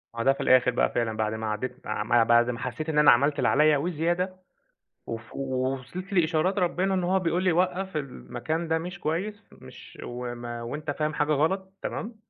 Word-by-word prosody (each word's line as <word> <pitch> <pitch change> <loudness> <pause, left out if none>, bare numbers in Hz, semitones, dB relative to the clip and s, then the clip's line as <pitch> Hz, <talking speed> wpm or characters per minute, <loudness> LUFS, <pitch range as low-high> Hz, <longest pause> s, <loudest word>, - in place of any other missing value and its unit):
آه، 115 - -2
ده 135 - +5
في - - -5
الآخر 125 -1 +5
بقى 120 - +1
فعلًا 115 -2 -1
بعد 110 0 0
ما 110 0 -4
عدّيت 105 +3 -5
ما 110 +2 +2
بعد 120 +1 +4
ما 120 -1 -3
حسيت 125 +6 -4
إن 150 -1 +2
أنا 150 - +8
عملت 145 +4 +3
اللي - - +2
عليَّ 150 +1 +4
وزيادة، 175 +4 -1 0.7
وف 115 0 -7
وصلت 135 - -3
لإشارات 175 +2 +2
ربنا 185 +1 +1
إن 185 -1 0
هو 185 +2 +2
بيقول 175 0 0
لي 185 - +4
وقَّف، 180 +1 0
المكان 150 +3 -4
ده 160 - +2
مش 175 +2 -7
كويس، 200 +7 -2
مش - - -14
وما 120 -1 -5
وأنت 150 +6 -4
فاهم 150 +1 -2
حاجة 150 +1 +1
غلط، 190 +6 0
تمام. 225 +1 -4
150 Hz, 190 wpm, -27 LUFS, 120-180 Hz, 0.7 s, أنا